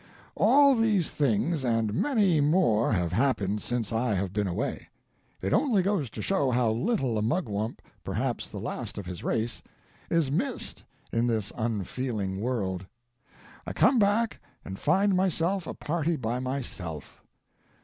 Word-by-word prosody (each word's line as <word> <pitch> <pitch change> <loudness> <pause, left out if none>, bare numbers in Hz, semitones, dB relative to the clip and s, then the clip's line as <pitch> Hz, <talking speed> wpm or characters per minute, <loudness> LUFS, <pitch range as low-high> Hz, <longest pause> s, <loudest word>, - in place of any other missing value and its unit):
] - - -26
"All 280 0 +6
these 220 -8 +2
things 145 +3 +1
and 115 -4 +1
many 200 - +2
more 145 - +3
have 90 -5 0
happened 105 -4 +1
since 120 -3 -2
I 115 -1 +1
have 95 0 -2
been 105 -1 0
away. 90 - -3 0.5
It 95 - 0
only 235 -10 +3
goes 185 - 0
to - - -6
show 190 -9 +1
how 120 -2 +2
little 130 - 0
a - - -1
Mugwump, 110 - -2 0.2
perhaps - - -2
the - - -8
last - - -5
of 100 - -5
his 90 -1 -7
race, 115 +1 -1 0.5
is 165 -5 +2
missed 240 - -2 0.3
in 115 +1 +1
this 110 -4 -1
unfeeling 110 -2 -2
world. 95 -7 -2 0.8
I - - -3
come 255 - +4
back 215 +2 +2 0.3
and 95 0 -7
find 200 0 +3
myself 185 0 +1
a - - -5
party 165 +1 -1
by 120 -3 -2
myself. 115 - -5
125 Hz, 150 wpm, -28 LUFS, -, 0.8 s, All